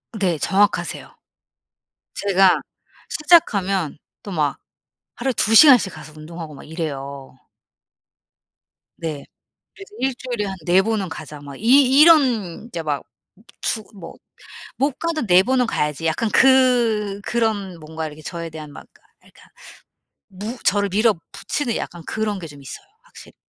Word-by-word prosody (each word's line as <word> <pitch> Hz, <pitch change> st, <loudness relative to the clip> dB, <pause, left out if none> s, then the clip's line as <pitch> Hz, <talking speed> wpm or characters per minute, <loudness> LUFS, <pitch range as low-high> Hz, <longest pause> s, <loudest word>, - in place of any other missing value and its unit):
네. 185 Hz, -6 st, 0 dB
정확하세요. 200 Hz, +5 st, 0 dB, 1.0 s
제가 195 Hz, -2 st, +3 dB, 0.5 s
시작하면 200 Hz, -, +2 dB, 0.3 s
또 200 Hz, -, -8 dB
막 150 Hz, -5 st, -1 dB, 0.6 s
하루에 265 Hz, +2 st, -1 dB
2 220 Hz, +2 st, +2 dB
시간씩 250 Hz, -, +7 dB
가서 155 Hz, -1 st, -12 dB
운동하고 160 Hz, 0 st, -9 dB
막 -, -, -12 dB
이래요. 140 Hz, -4 st, -6 dB, 1.6 s
네. 155 Hz, -4 st, -5 dB, 0.5 s
그래서 395 Hz, 0 st, -13 dB
'일주일에 245 Hz, -4 st, -2 dB
한 195 Hz, -1 st, -5 dB
4 180 Hz, +2 st, +4 dB
번은 210 Hz, -2 st, -1 dB
가자.' 155 Hz, -2 st, -9 dB
막 140 Hz, -1 st, -10 dB
이 265 Hz, +4 st, +5 dB
이런 250 Hz, -, +4 dB
이제 170 Hz, -8 st, -5 dB
막 150 Hz, -3 st, -2 dB, 0.6 s
주 220 Hz, -, -1 dB
뭐 175 Hz, -5 st, -10 dB, 0.6 s
'못 275 Hz, 0 st, 0 dB
가도 330 Hz, -5 st, -2 dB
4 180 Hz, -2 st, +6 dB
번은 255 Hz, 0 st, +1 dB
가야지.' 150 Hz, -1 st, -2 dB
약간 190 Hz, +8 st, 0 dB
그 240 Hz, -6 st, +3 dB
그런 205 Hz, -6 st, -2 dB
뭔가 160 Hz, +1 st, -6 dB
이렇게 155 Hz, 0 st, -11 dB
저에 170 Hz, +1 st, -6 dB
대한 155 Hz, -2 st, -9 dB
막 -, -, -11 dB
아 -, -, -30 dB, 0.2 s
아 -, -, -20 dB
그러니까 -, -, -21 dB, 0.8 s
무 210 Hz, +6 st, -7 dB
저를 200 Hz, 0 st, +2 dB
밀어붙이는 220 Hz, -, -1 dB
약간 175 Hz, -1 st, -6 dB
그런 215 Hz, -2 st, -2 dB
게 175 Hz, -, -7 dB
좀 145 Hz, -2 st, -13 dB
있어요 390 Hz, -, -10 dB, 0.2 s
확실히. -, -, -16 dB
195 Hz, 260 characters per minute, -21 LUFS, 160-240 Hz, 1.6 s, 시간씩